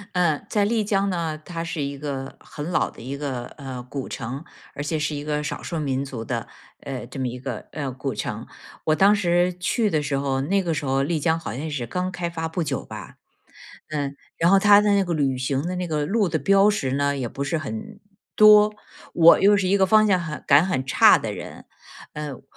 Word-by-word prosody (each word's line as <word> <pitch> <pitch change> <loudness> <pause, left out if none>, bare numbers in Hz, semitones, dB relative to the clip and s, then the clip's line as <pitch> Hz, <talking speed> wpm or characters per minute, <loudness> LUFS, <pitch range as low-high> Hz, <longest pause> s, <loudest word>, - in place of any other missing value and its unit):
嗯， 170 -5 +1
在 210 - +1
丽 220 +1 +1
江 200 -1 +1
呢， 165 -4 -2
它 165 -1 -5
是 165 -2 -4
一 140 0 -3
个 135 -2 -5
很 150 +3 -7
老 - - +1
的 - - -14
一 135 +4 -5
个， 135 -4 -4
呃， 135 -4 -6
古 135 -1 -5
城， 130 +6 -6 0.3
而 140 - -4
且 155 +2 -2
是 150 0 -2
一 145 - -5
个 150 0 -2
少 150 - -5
数 170 - -4
民 135 -2 -1
族 125 -5 -6
的， - - -4 0.3
呃， 130 -3 -6
这 135 - -8
么 130 - -1
一 125 +1 -6
个， 125 -3 -6
呃， 140 -3 -4
古 130 +1 -4
城， - - -5 0.4
我 155 - +2
当 200 +5 +5
时 175 -2 +2
去 215 +4 +1
的 155 -5 0
时 145 -1 -1
候， 135 -1 -1
那 195 +8 +1
个 175 - -2
时 145 - -3
候 135 +1 +1
丽 155 +3 0
江 160 +2 +1
好 165 - -6
像 150 +4 -4
是 140 -6 -4
刚 180 +8 -2
开 175 -1 -3
发 165 -1 -4
不 165 +2 -3
久 140 -4 -3
吧， - - -9 0.8
嗯， 140 -2 -3 0.2
然 170 +1 +3
后 195 - +6
他 205 +1 +7
的 210 0 +2
那 200 - +3
个 175 -2 -2
旅 135 -4 0
行 130 +1 -1
的 180 +1 -3
那 180 0 -2
个 155 -3 -1
路 205 +1 +1
的 160 -2 -1
标 195 +7 +4
识 205 -11 0
呢， 140 0 0
也 130 -3 -3
不 140 +4 -4
是 140 +4 -1
很 215 +6 -6 0.3
多。 210 0 +7 0.4
我 170 0 +7
又 205 +1 +5
是 195 -2 0
一 195 - +3
个 190 -1 +3
方 215 +3 +5
向 190 -2 +4
很 160 -3 -6
感 145 +5 +6
很 175 -9 -1
差 130 - +6
的 - - -4
人。 - - -9 0.5
嗯， 150 -3 -6
155 Hz, 245 characters per minute, -23 LUFS, 140-185 Hz, 0.8 s, 他